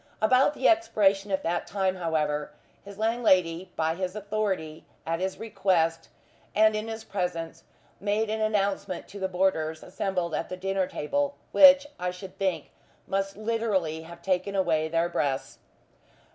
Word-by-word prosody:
About 255 +6 +4
the - - +2
expiration 205 - +3
of 190 0 -1
that 175 +1 -1
time, 190 -2 0
however, 150 -4 -1 0.3
his 200 -1 -11
landlady, 190 -6 +2
by 160 0 +1
his 185 +2 -4
authority, 205 -7 -2 0.2
at 165 0 -1
his 190 +1 -2
request, 180 -7 0 0.5
and 215 0 +5
in 215 +1 -3
his 225 0 -6
presence, 170 -5 -4 0.3
made 210 +2 0
an 220 +1 -2
announcement 200 -3 -1
to 200 - -9
the 190 - 0
boarders 180 -4 0
assembled 180 -3 -2
at 160 +2 -2
the 185 - -5
dinner 195 0 -1
table 285 - -1 0.2
which, 280 -1 +8
I 180 - -1
should 185 +2 -9
think, 190 -3 -1 0.3
must 195 0 -2
literally 210 -8 -1
have 170 +1 -12
taken 190 +1 0
away 165 -5 +1
their 165 +1 +1
breaths. 140 -5 -2
190 Hz, 150 wpm, -27 LUFS, 170-210 Hz, 0.5 s, which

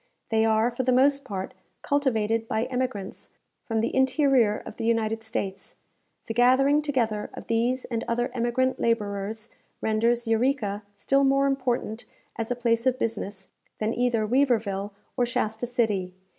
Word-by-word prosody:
They 220 0 +3
are, 220 +2 +3
for 240 - -2
the 255 0 +1
most 275 +2 +4
part, 195 -6 -5 0.3
cultivated 225 -6 +1
by 220 0 0
emigrants 250 -6 -4 0.4
from 225 -2 0
the 230 - -1
interior 265 -4 +3
of - - -9
the 230 - -4
United 225 -1 0
States. 195 -3 -4 0.5
The 225 - -4
gathering 260 +5 +4
together 235 -8 -1
of - - -8
these 240 +3 0
and 230 -2 -3
other 240 +1 0
emigrant 255 +2 0
labourers, 215 -1 -1 0.3
renders 235 +2 +1
Eureka 225 -3 +1
still 275 +7 +2
more 275 0 +3
important 255 -4 -1 0.3
as 225 -1 -3
a 245 - 0
place 230 0 +1
of 255 0 +2
business, 205 -5 -4 0.3
than 220 +1 -1
either 240 -3 +1
Weaverville 220 -6 +1 0.3
or 245 -2 +1
Shasta 220 0 -2
City. 210 -7 0
230 Hz, 150 wpm, -26 LUFS, 220-255 Hz, 0.5 s, most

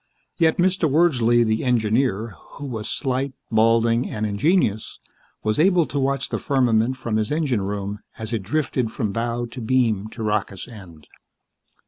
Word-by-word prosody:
Yet 160 -2 +3
Mr. 180 -2 +2
Wordsley, 125 -7 +3
the 110 0 0
engineer, 115 -2 +1 0.2
who 145 - -8
was 115 -5 -5
slight, 135 0 -1 0.2
balding 115 +2 +3
and 110 0 -3
ingenious, 110 - +1 0.5
was 110 +3 0
able 175 0 +4
to 145 - -3
watch 135 0 0
the - - -2
firmament 125 -2 +1
from 115 -4 -2
his 110 -1 -1
engine 145 -8 0
room 100 +1 -4 0.2
as 110 +1 -5
it 110 - -1
drifted 125 0 -1
from 105 -3 -2
bow 120 +2 -2
to 120 +2 -9
beam 110 -4 +1
to 110 +1 -7
rocket's 105 -3 -2
end. 90 - -13
115 Hz, 155 wpm, -22 LUFS, 110-135 Hz, 0.5 s, able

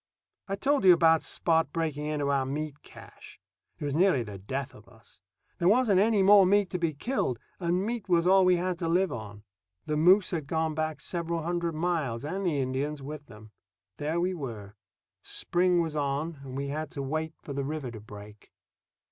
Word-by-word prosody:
I 195 - -2
told 275 +4 +1
you 185 -2 +9
about 165 -1 +4
Spot 165 -1 +1
breaking 155 -3 -2
into 145 -2 -1
our 135 -1 +2
meat 145 +2 -4
cache. - - -14 0.4
It - - -5
was 145 - -2
nearly 165 -5 +3
the 105 -3 -9
death 130 +8 -4
of - - -16
us. - - -20 0.4
There 170 - +2
wasn't 215 -2 +4
any 210 -1 +3
more 200 0 +8
meat 195 0 +3
to 180 - -2
be 165 -3 -1
killed, 145 - -1 0.2
and 180 +2 0
meat 230 -3 -4
was 170 -1 +3
all 190 +1 +6
we 180 0 +5
had 180 0 -2
to 170 - -2
live 180 +3 +2
on. 105 -3 -8 0.4
The 150 -1 -1
moose 180 +5 +5
had 160 -6 -3
gone 160 0 0
back 155 0 -3
several 170 -2 -3
hundred 170 -1 -2
miles 155 -8 -1
and 190 +6 -3
the 165 -6 0
Indians 135 +2 -2
with 150 +1 -8
them. 110 -2 -14 0.5
There 155 +3 -1
we 180 +2 0
were. 115 - -7 0.5
Spring 180 0 +1
was 160 -2 -5
on, 145 +2 -2
and 130 -1 -7
we 140 0 -3
had 155 +1 -4
to 140 - -4
wait 155 +3 -3
for 140 - -6
the 140 0 -2
river 145 -3 -4
to 110 - -9
break. 105 0 -13
155 Hz, 200 wpm, -28 LUFS, 140-180 Hz, 0.5 s, you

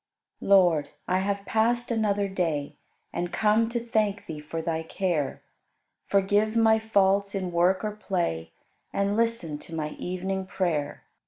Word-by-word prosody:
Lord, 175 -7 +4 0.2
I 185 +1 +2
have 200 +1 -2
passed 235 +3 +1
another 205 -3 +1
day 160 -7 -2 0.4
And 175 0 -2
come 220 +1 +2
to 235 0 -1
thank 215 -3 0
Thee 155 -2 -6
for 155 +2 -5
Thy 160 0 -1
care. 160 -3 -2 0.6
Forgive 205 +3 +2
my 220 -1 +5
faults 200 -2 +2
in 185 -2 -2
work 180 +3 +2
or 210 - -1
play 175 - -2 0.4
And 200 +1 0
listen 230 -10 0
to 165 - -9
my 155 -1 -2
evening 185 +3 -4
prayer. 165 -6 -2
195 Hz, 145 wpm, -27 LUFS, 170-210 Hz, 0.6 s, my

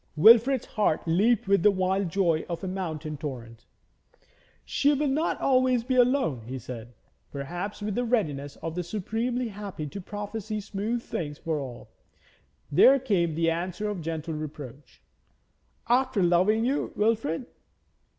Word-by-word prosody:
Wilfrid's 230 - +6
heart 205 -7 0
leaped 200 +7 +2
with 200 -2 +4
the 210 - +6
wild 190 -1 0
joy 170 -3 +1
of 170 +2 -4
a - - -2
mountain 160 -5 -4
torrent. 120 -6 -7 1.0
'She 285 +1 +2
will 295 +2 0
not 300 +5 0
always 255 -2 +3
be 260 +2 -1
alone,' 250 - +3
he 130 +2 -4
said, 120 -2 -9 0.4
perhaps 175 +9 -5
with 210 0 -2
the 245 - 0
readiness 150 - -1
of 165 -1 -3
the 180 - -2
supremely 225 +7 -2
happy 200 -6 -6
to 195 +7 -7
prophesy 210 +2 -5
smooth 215 +3 -3
things 145 -3 -4
for 160 -2 -2
all. 125 -4 -8 0.8
There 265 - +7
came 185 - 0
the 165 0 +2
answer 180 +5 -3
of 195 -4 -5
gentle 160 0 -4
reproach: 145 -3 -8 0.8
'After 250 -4 +2
loving 185 +6 +3
you, 270 +3 0
Wilfrid?' 220 -3 0
190 Hz, 145 wpm, -27 LUFS, 155-230 Hz, 1.0 s, There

